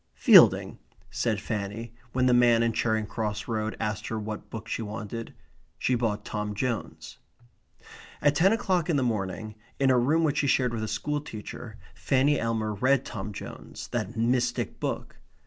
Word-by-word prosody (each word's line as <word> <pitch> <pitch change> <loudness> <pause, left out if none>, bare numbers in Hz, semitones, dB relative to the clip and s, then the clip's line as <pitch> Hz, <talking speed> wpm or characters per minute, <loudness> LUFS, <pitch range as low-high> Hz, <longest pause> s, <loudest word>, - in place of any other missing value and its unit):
"Fielding," - - +6 0.3
said 120 -3 0
Fanny, 110 +2 -4 0.2
when 130 +1 +1
the 125 - +4
man 120 -1 +5
in 115 -1 +1
Charing 110 -2 0
Cross 105 0 -3
Road 110 -2 -2
asked 105 0 -2
her 110 - -3
what 110 0 -6
book 110 0 -7
she - - -3
wanted. 110 +1 -6 0.4
She 130 - 0
bought 110 -4 -1
Tom 105 -1 -3
Jones. 120 0 -4 1.0
At 145 0 +3
ten 180 +6 +4
o'clock 185 -6 +1
in 165 - +2
the 135 - +2
morning, 110 -2 -2 0.3
in 135 -1 +4
a 125 - +4
room 155 +7 +2
which 155 -1 +1
she 140 - +1
shared 125 -2 +2
with 115 - -3
a - - -2
school 150 +6 -2
teacher, 110 -7 -8 0.2
Fanny 140 +2 +2
Elmer 110 -2 -1
read 130 +5 +2
Tom 95 +2 -5
Jones 100 - -9
that 115 -1 -3
mystic 120 +2 0
book. - - -4
115 Hz, 170 wpm, -27 LUFS, 110-130 Hz, 1.0 s, Fielding